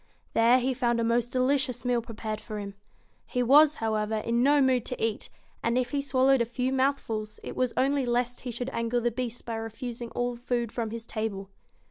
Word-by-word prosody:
There 230 +2 +5
he 260 +1 0
found 240 -2 +1
a - - +1
most 235 +1 +1
delicious 255 -1 +1
meal 245 -1 +2
prepared 220 -1 -5
for 215 -2 -6
him. 200 -1 -6 0.5
He 250 - 0
was, 295 +4 +6
however, 220 -2 -1
in 230 +2 0
no 285 +3 +5
mood 260 -3 +3
to 250 - -4
eat; 225 -1 -2 0.3
and 235 +1 +1
if 250 -1 0
he 285 - 0
swallowed 270 -1 +3
a - - +2
few 250 +3 -2
mouthfuls, 230 -6 -1
it - - -6
was 255 -2 +1
only 270 0 +2
lest 245 +1 0
he 250 - -5
should 245 +2 -4
anger 230 +1 0
the 240 0 0
Beast 240 0 -4
by 235 - -4
refusing 235 +2 -6
all 245 0 -1
food 240 -1 -2
from 230 -2 -3
his 230 +1 -6
table. 200 -4 -4
240 Hz, 205 wpm, -28 LUFS, 225-255 Hz, 0.5 s, was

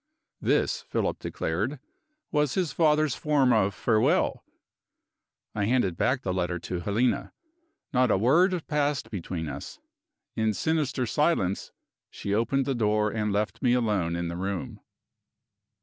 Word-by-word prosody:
This, - - +1
Philip 470 - -2
declared, - - -2 0.5
was 150 -3 +1
his 180 -5 0
father's 155 -3 +3
form 140 -5 +2
of 100 -3 +2
farewell. 110 +1 +2 1.1
I 105 -1 0
handed 115 -6 +1
back 130 +8 0
the 95 - -1
letter 90 -1 -1
to 90 +1 -4
Helena. 120 +9 0 0.6
Not 125 -1 +3
a - - +3
word 165 - +3
passed 145 -3 -1
between 85 -4 -4
us. 75 - -7 0.6
In 110 -2 +1
sinister 150 -4 0
silence 115 - 0 0.4
she 100 - -4
opened 120 +5 +1
the 135 - 0
door 105 -2 +1
and 105 -1 -1
left 105 +1 -1
me 125 -3 +3
alone 105 -9 +1
in 85 0 -2
the 85 +1 -4
room. 105 +5 -4
115 Hz, 135 wpm, -27 LUFS, 100-145 Hz, 1.1 s, father's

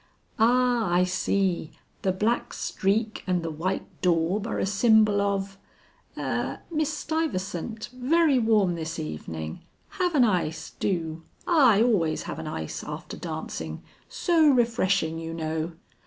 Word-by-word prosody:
"Ah, 240 -2 +3
I 175 +1 +4
see, 185 -2 0 0.3
the 190 - +1
black 215 +6 0
streak 215 +3 -1
and 180 -2 +1
the 165 - -3
white 175 +5 -2 0.2
daub 180 +4 +1
are - - -2
a - - 0
symbol 210 0 +4
of, 195 -1 -1 0.6
'Er - - -2
Miss 310 -1 0
Stuyvesant 225 - -3
very 280 +2 +3
warm 215 -6 +3
this 165 -1 -4
evening! 80 +1 -5 0.4
Have 355 -3 +1
an 265 - +6
ice, 170 -7 0
do. 165 -4 -1 0.2
I 255 - +5
always 180 -10 +1
have - - -6
an 160 - -5
ice 80 - -5
after - - -7
dancing; 80 -1 -5 0.3
so 325 -3 +3
refreshing, 200 - +2
you 165 0 -5
know.'" 160 +1 -3
195 Hz, 135 wpm, -26 LUFS, 165-235 Hz, 0.6 s, an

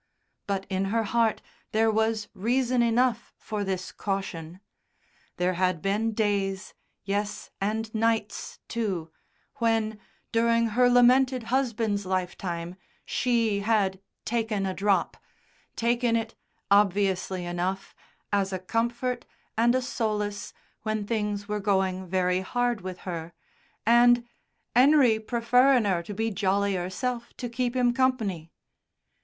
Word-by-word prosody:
But 195 -1 -1
in 190 0 -1
her 225 +3 0
heart 225 0 +1 0.3
there 220 +1 +3
was 220 0 0
reason 245 +4 +1
enough 235 0 +1
for 210 -1 -4
this 190 -2 -3
caution; 185 -4 -4 0.8
there 180 +1 +1
had 180 -1 +1
been 210 +5 0
days 200 -2 -1 0.3
yes, 205 +1 -3
and 220 +2 -2
nights 225 -1 -1
too 190 -9 -3 0.5
when, 225 -2 0 0.3
during 230 0 +3
her 245 +3 +4
lamented 250 +1 +4
husband's 225 -6 0
lifetime, 180 -1 -3 0.3
she 230 -4 +1
had 200 -3 +1 0.3
"taken 220 -4 -1
a 190 - -1
drop," 200 +1 +1 0.6
taken 235 0 +1
it, 225 0 -2 0.4
obviously 195 -2 +2
enough, 180 +2 -3 0.4
as 200 -1 +1
a 190 - -1
comfort, 235 +5 -1 0.3
and 235 +2 +3
a 255 - +1
solace 210 -4 -2 0.3
when 215 -1 -2
things 210 -2 -2
were 210 0 -2
going 190 -2 0
very 180 0 +1
hard 240 +2 -1
with 185 0 -7
her, 170 -2 -5 0.5
and 240 +1 +5 0.5
"'Enery 255 -3 +5
preferrin' 245 +2 +3
'er 185 -4 +1
to 200 +4 -8
be 225 +2 -1
jolly 200 +1 +1
'erself 235 +7 -3
to 245 - -4
keep 245 +1 -2
'im 245 -1 +3
company." 220 -11 0
215 Hz, 125 wpm, -27 LUFS, 190-235 Hz, 0.8 s, and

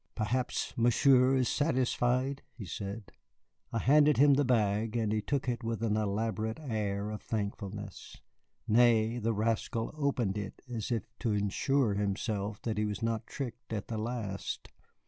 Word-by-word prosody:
"Perhaps 120 +3 -1
Monsieur 125 +2 +5
is 130 -2 +2
satisfied," 130 -2 +1
he 110 - -7
said. 100 +4 -6 0.6
I - - -1
handed 145 +5 +5
him 145 +1 +7
the 145 +1 +3
bag, 110 -3 +1
and 110 -2 0
he 110 0 +1
took 135 +4 -1
it 120 0 -1
with 115 0 -2
an 105 -2 +1
elaborate 110 +1 -1
air 105 -7 -2
of 105 - -5
thankfulness. 105 -1 -5 0.5
Nay, 115 0 +4
the 115 0 0
rascal 115 +2 -1
opened 125 -9 0
it 100 -2 -7
as 120 -1 -4
if 115 -3 0 0.2
to 115 -4 0
assure 105 +4 +1
himself 100 0 -2
that 110 -2 -1
he 105 - +1
was 105 +1 -3
not 115 0 -1
tricked 125 -5 -6
at 105 -2 -4
the 110 -2 -2
last. 110 -4 -4
115 Hz, 155 wpm, -31 LUFS, 105-125 Hz, 0.6 s, him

